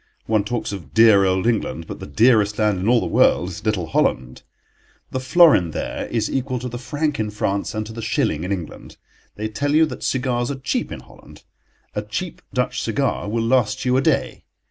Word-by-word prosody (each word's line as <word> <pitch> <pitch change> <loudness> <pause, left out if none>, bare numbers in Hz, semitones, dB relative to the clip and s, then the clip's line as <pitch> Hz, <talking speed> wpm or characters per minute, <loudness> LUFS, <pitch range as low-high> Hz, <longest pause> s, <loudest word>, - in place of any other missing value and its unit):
One 110 -2 +1
talks 115 +1 -3
of 95 -4 -9
dear 110 -3 +6
old 95 0 +1
England, 110 -8 -1
but - - -8
the - - -8
dearest 110 -3 +3
land 105 -3 +1
in 95 - -2
all 120 0 +5
the - - -2
world 85 +5 +3
is 90 0 -8
little 105 -5 0
Holland. 65 -5 -1 0.7
The 130 - -2
florin 130 - +5
there - - -4
is - - -1
equal 130 -1 -2
to 125 +1 -5
the 120 0 -6
franc 145 +3 -2
in 110 -1 -1
France 100 0 -2
and 110 0 -2
to 110 - -9
the 115 - -6
shilling 110 - 0
in 90 - -4
England. 90 -5 -6 0.4
They 110 +1 -3
tell 145 +7 -1
you 160 +1 +6
that 155 - -7
cigars 125 -2 -1
are 140 - -2
cheap 135 +1 -2
in - - -7
Holland. - - -17 0.5
A - - -2
cheap - - -5
Dutch - - -1
cigar - - -1
will 115 +1 -1
last 115 -2 +1
you 125 0 +2
a 130 - +3
day. - - 0
110 Hz, 210 wpm, -21 LUFS, 100-130 Hz, 0.7 s, dear